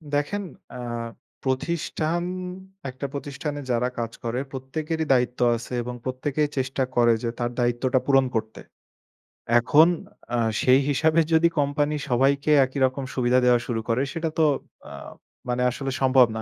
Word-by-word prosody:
দেখেন 175 +8 -1 0.3
আ - - -7 0.6
প্রতিষ্ঠান, 160 +4 -1 0.7
একটা 130 +2 -6
প্রতিষ্ঠানে 145 +1 -5
যারা 120 +1 +1
কাজ 115 -1 -2
করে 120 +1 -2
প্রত্যেকেরই 155 +5 -3
দায়িত্ব 125 -1 +1 0.2
আছে 120 +2 -7
এবং 125 +1 -5
প্রত্যেকেই 140 +3 -1
চেষ্টা 130 +1 0
করে 120 -1 +5
যে, 120 - 0
তার 120 0 -1
দায়িত্বটা 120 +2 +1
পূরণ 135 -1 +4
করতে। 110 0 -3 1.0
এখন 145 +7 +5 0.5
আ - - +1 0.2
সেই 130 +1 +5
হিসাবে 160 +3 +3
যদি 160 +1 +5
কোম্পানি 145 +1 +1
সবাইকে 140 +4 +2
একই 130 +2 -5
রকম 130 +1 -2
সুবিধা 125 0 +3
দেওয়া 125 -1 +5
শুরু 115 -2 -1
করে, 115 +3 +2
সেটা 165 -1 -2
তো 160 - +5 0.5
আ - - -8 0.6
মানে 125 0 0
আসলে 135 +2 -4
সম্ভব 130 -2 +6
না। - - -3
130 Hz, 145 wpm, -24 LUFS, 125-145 Hz, 1.0 s, সম্ভব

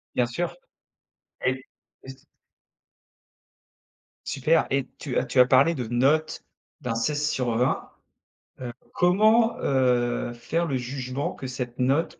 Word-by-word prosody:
Bien 125 - +3
sûr. 170 +9 -3 0.9
Et 130 0 0 0.4
et - - -13
c 135 +2 -14 2.0
Super. 155 +4 +2
Et 135 -1 0
tu 135 -4 -3
as - - +1
tu 125 +1 0
as 125 - +9
parlé 135 +6 +4
de 125 -6 -4
notes, 140 +7 +1 0.4
d'un 125 -2 -2
16/20. 125 -2 0 0.7
Heu, 120 -2 -6 0.2
comment, 215 +6 +4
heu, 125 -3 +1
faire 165 +8 -2
le 140 -5 -2
jugement 130 +2 -4
que 130 - -7
cette 125 -1 -5
note 135 +6 +1
130 Hz, 125 wpm, -25 LUFS, 125-155 Hz, 2.0 s, as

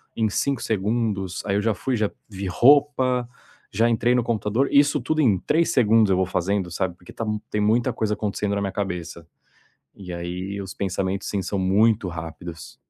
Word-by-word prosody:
em 110 -1 +1
5 135 +5 -1
segundos. 105 -3 -1
Aí 100 -1 0
eu 100 - +2
já 110 0 +1
fui, 125 +7 -2
já 105 -3 0 0.2
vi 100 -2 -6
roupa, 130 +2 +3 0.4
já 115 +4 +2
entrei 120 +1 +2
no 125 -1 +2
computador 115 +3 0
isso 145 0 +4
tudo 155 +6 0
em 105 -9 +4
3 165 - +1
segundos 110 -3 +4
eu 95 - +3
vou 95 - +2
fazendo, 90 +1 -1
sabe, 90 0 -2
porque 90 - -14
tá 115 - -4 0.2
tem 105 - -1
muita 115 +4 +2
coisa 110 -2 -1
acontecendo 105 -1 -2
na 100 - -1
minha 100 -1 -2
cabeça. 85 -4 -4 0.7
E 95 -2 -9
ai 90 +3 -5
os 95 -1 -7
pensamentos 95 0 -2
sim, 100 - -1
são 100 +2 -2
muito 105 +2 +3
rápidos. 85 0 -8
105 Hz, 185 wpm, -23 LUFS, 95-115 Hz, 0.7 s, isso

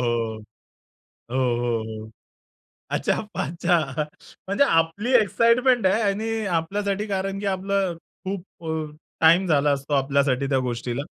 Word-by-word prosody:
हो. 115 -2 -1 0.9
हो, 130 - -2
हो, 120 -3 +1
हो. 110 0 -8 0.8
अच्छा - - 0
पाच्छा. 170 +3 +1 0.7
म्हणजे 200 +9 +3
आपली 165 +7 +1
एक्साइटमेंट 230 +3 +3
आहे 200 +4 +3
आणि 220 +2 -1
आपल्यासाठी 200 +5 -1
कारण, 195 0 -2
की 205 - -4
आपलं 190 -2 -1 0.3
खूप 190 -1 -4 0.2
अ, 155 -1 -3 0.3
टाईम 170 +4 +5
झाला 150 -3 +3
असतो 140 +1 -2
आपल्यासाठी 140 -1 +2
त्या 135 - +3
गोष्टीला 120 +2 -3
165 Hz, 125 wpm, -24 LUFS, 135-200 Hz, 0.9 s, टाईम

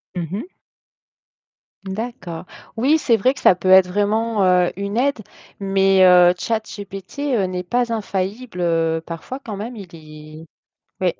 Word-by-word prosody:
Mmh 170 -2 -3
mh. 220 - -4 1.4
D'accord. 190 -4 -6 0.3
Oui, 275 +8 +3
c'est 240 -6 +2
vrai 255 +6 +2
que - - -10
ça - - +6
peut 185 +1 -3
être 190 -1 +7
vraiment, 205 +3 0
heu, 180 -1 +3
une 200 +3 -4
aide, 275 -1 +1 0.4
mais, 195 -1 +3
heu, 180 -1 +7
ChatGPT, 220 +5 -4
heu, 200 - +1
n'est 180 0 -3
pas 240 +4 -1
infaillible, 200 0 -4
heu 165 -1 +1
parfois, 170 +11 -7
quand 215 - -6
même, 230 +4 -6
il 190 -5 -11
est 155 0 -12 0.6
oui. 180 -2 0
195 Hz, 150 wpm, -20 LUFS, 180-225 Hz, 1.4 s, être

